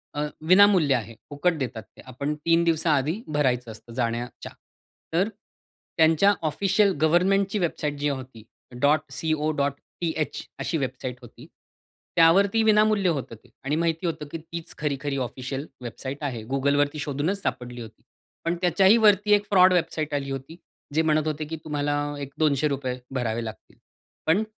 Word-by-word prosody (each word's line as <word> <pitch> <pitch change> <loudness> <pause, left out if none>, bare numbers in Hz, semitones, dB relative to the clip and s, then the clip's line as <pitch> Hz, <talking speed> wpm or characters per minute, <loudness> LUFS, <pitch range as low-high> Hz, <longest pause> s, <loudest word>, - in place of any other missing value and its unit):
अ, 145 - -1 0.3
विनामूल्य 185 -6 +6
आहे. 115 -2 -4 0.2
फुकट 150 +4 +1
देतात 120 -5 -4
ते. - - -18
आपण 140 +4 -3
3 165 0 +4
दिवसांआधी 160 +2 +1
भरायचं 125 -5 +1
असतं 115 +2 -12
जाण्याच्या 120 0 -3 0.6
तर 185 +6 +2 0.7
त्यांच्या 165 +5 +5 0.2
ऑफिशियल 195 +5 +2
गव्हर्नमेंटची 195 +5 +3
वेबसाईट 155 -4 -1
जी 145 0 +1
होती 130 -5 -6 0.7
.co.th 155 +1 -2 0.2
अशी 165 - -1
वेबसाइट 130 -2 -4
होती. 120 - -14 0.7
त्यावरती 195 +7 +5
विनामूल्य 210 -3 +4
होतं 135 -7 -3
ते - - -21
आणि 140 +2 0
माहिती 165 +1 0
होतं 155 -3 -4
की 165 - -3
तीच 165 +1 -8
खरी-खरी 145 -1 -2
ऑफिशियल 130 +3 -5 0.2
वेबसाईट 130 +3 -6
आहे. 120 -6 -3
Googleवरती 145 +2 +1
शोधूनच 150 +8 -2
सापडली 125 -8 -4
होती. 110 -1 -12 0.4
पण 170 +1 +1
त्याच्याही 190 +5 +5
वरती 210 0 +4
एक 205 - -1
फ्रॉड 185 -2 +6
वेबसाईट 155 -3 -1
आली 140 -1 -2
होती. 135 +5 -6 0.4
जे 160 - +3
म्हणत 155 -1 +1
होते 155 0 -2
की 160 +2 -5
तुम्हाला 145 -1 -1 0.3
एक 140 0 -7
200 150 -2 +2
रुपये 130 -3 -2 0.2
भरावे 120 -2 -1
लागतील. 110 -1 -10 0.5
पण 165 +7 +3
150 Hz, 145 wpm, -25 LUFS, 135-170 Hz, 0.7 s, विनामूल्य